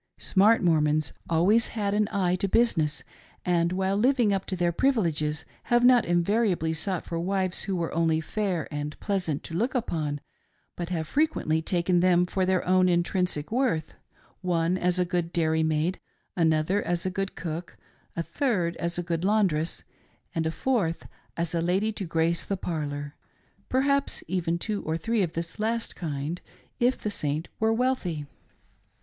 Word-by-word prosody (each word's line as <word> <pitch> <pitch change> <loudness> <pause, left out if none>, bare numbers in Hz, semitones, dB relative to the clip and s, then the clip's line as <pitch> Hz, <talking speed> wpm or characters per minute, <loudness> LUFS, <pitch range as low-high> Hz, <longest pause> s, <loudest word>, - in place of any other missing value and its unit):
Smart 210 +3 +4
Mor 165 -3 +4
mons 150 -1 +1
have - - -20
always 190 +8 +4
had 200 -2 0
an 210 0 +2
eye 185 -3 +1
to 190 +2 -1
business, 165 -10 +2 0.4
and 170 -1 +2
while 190 +1 0
living 240 -1 +3
up 195 -1 -1
to 190 - -2
their 175 -1 +1
privileges 165 - 0 0.2
have 240 0 +3
not 245 -2 +6
invariably 175 -1 +1
sought 180 +2 -2
for 165 - -3
wives 185 +1 0
who 195 -1 -1
were 170 -2 -2
only 165 -1 +2
fair 185 0 -2
and 145 +1 -4
pleasant 180 -8 -1
to - - -8
look 235 +10 0
upon, 155 - -1 0.6
but 175 -1 -4
have 160 -3 -2
frequently 160 - +1
taken 175 +1 +1
them 180 0 +4
for 185 +1 -1
their 185 -1 +1
own 185 0 +4
intrinsic 175 -2 0
worth: 230 - 0 0.3
— - - -31
one 175 -1 +1
as 180 -1 +1
a 180 - +2
good 175 -1 -1
dairymaid, 160 +1 +1 0.4
another 165 +3 +2
as 175 0 -1
a 185 - 0
good 195 +1 -3
cook, 170 0 -5 0.4
a 170 - -1
third 185 - 0
as 170 +1 -2
a 175 - -1
good 170 -1 -2
laun 210 +2 +4
dress, 160 -2 -2 0.5
and 160 -1 0
a - - 0
fourth 190 -6 -1 0.3
as 170 -1 -1
a 170 - +1
lady 190 +6 +1
to 205 -2 -5
grace 165 0 +1
the 195 - -2
parlor— 145 -4 -4 0.5
perhaps 280 +2 +2
even 170 -1 0
two 205 +3 -3
or 160 +1 -2
three 230 +4 0
of 170 -4 -1
this 165 +4 -5
last 225 +2 -1
kind, 155 +1 -4 0.4
if 245 +2 +3
the 210 - -3
Saint 150 -1 -2
were 220 0 +3
wealthy. 225 - 0
175 Hz, 175 wpm, -27 LUFS, 165-200 Hz, 0.6 s, not